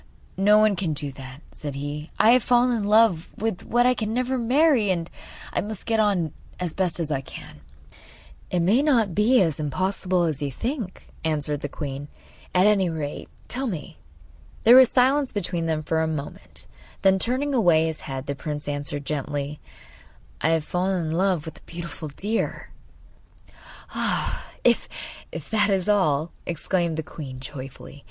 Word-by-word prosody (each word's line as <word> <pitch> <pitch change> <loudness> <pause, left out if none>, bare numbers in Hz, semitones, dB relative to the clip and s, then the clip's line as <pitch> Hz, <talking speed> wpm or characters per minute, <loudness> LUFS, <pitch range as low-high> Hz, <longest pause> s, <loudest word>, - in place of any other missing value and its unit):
'No 205 +2 +5
one 215 -1 +4
can 170 -4 -1
do 145 -1 -4
that,' 135 +2 -10
said 145 -2 -6
he. 145 +2 -5
'I 225 - +6
have 250 +1 +6
fallen 245 0 +3
in 220 - -1
love 205 -6 +4
with 220 -4 -2
what 240 +1 +2
I 250 - +5
can 220 -2 -3
never 255 +1 0
marry, 255 -2 +3
and 170 -3 0 0.5
I - - +1
must 210 -1 -6
get 225 -1 +1
on 190 -8 +1 0.3
as 175 -3 -2
best 185 -2 0
I 135 -2 0
can.' 135 - -11 0.9
'It 180 - +1
may 205 +10 +4
not 235 - +2
be 215 +5 +4
as 160 -4 -1
impossible 185 +4 0
as 155 -4 -1
you 140 -1 -2
think,' 230 - -4 0.2
answered 150 -2 0
the 145 - -3
queen. 140 -1 -5 0.5
'At 180 +1 +5
any 200 -4 +4
rate, 155 -3 -5 0.2
tell 265 +2 -2
me.' 170 - -6 0.6
There 235 +2 +8
was 260 -1 +9
silence 265 +2 +3
between 175 -4 -1
them 155 -1 -1
for 160 +1 0
a 160 - +1
moment, 155 -3 -4 0.4
then, 190 0 +5
turning 260 +7 0
away 175 -10 +4
his 160 -1 -3
head, 135 -2 -5
the 140 - -2
prince 150 0 -5
answered 145 0 -3
gently: 145 0 -3 0.8
'I 160 - +2
have 165 -1 +2
fallen 180 +1 -1
in - - -2
love 180 -2 +1
with 160 - -8
a - - -27
beautiful 170 -2 -6
deer!' 205 +10 -3 1.2
'Ah, - - -2 0.2
if - - +3 0.6
that 215 -1 +3
is 190 -2 +1
all,' 165 -7 +2 0.2
exclaimed 170 0 0
the 160 - -2
queen 135 -5 -8
joyfully. 135 0 -9
175 Hz, 170 wpm, -24 LUFS, 150-215 Hz, 1.2 s, was